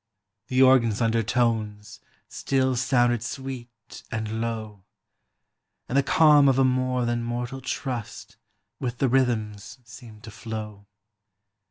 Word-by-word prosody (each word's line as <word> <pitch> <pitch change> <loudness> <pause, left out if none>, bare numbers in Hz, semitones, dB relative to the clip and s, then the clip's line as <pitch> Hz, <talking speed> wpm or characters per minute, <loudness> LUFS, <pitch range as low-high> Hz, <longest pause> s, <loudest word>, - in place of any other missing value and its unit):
The 130 0 +3
organ's 120 -5 +4
undertones 110 -2 -1 0.3
SI 135 - -3
ill 130 -1 +2
sounded 120 -2 +2
sweet 120 -1 -8
and 110 -1 -3
low, 110 -4 -5 1.0
Ami 130 - -1
the - - +6
calm 150 -1 +5
of 135 - +2
a, 135 - +4
more 130 -1 0
than 120 0 -1
mortal 120 +2 -4
trust 125 -4 -5 0.4
Willi 125 -2 -3
the 135 - +1
rhythms 110 -5 -1
seemed 115 -2 -14
to 110 - -10
flow. 105 -2 -7
120 Hz, 125 wpm, -25 LUFS, 110-130 Hz, 1.0 s, the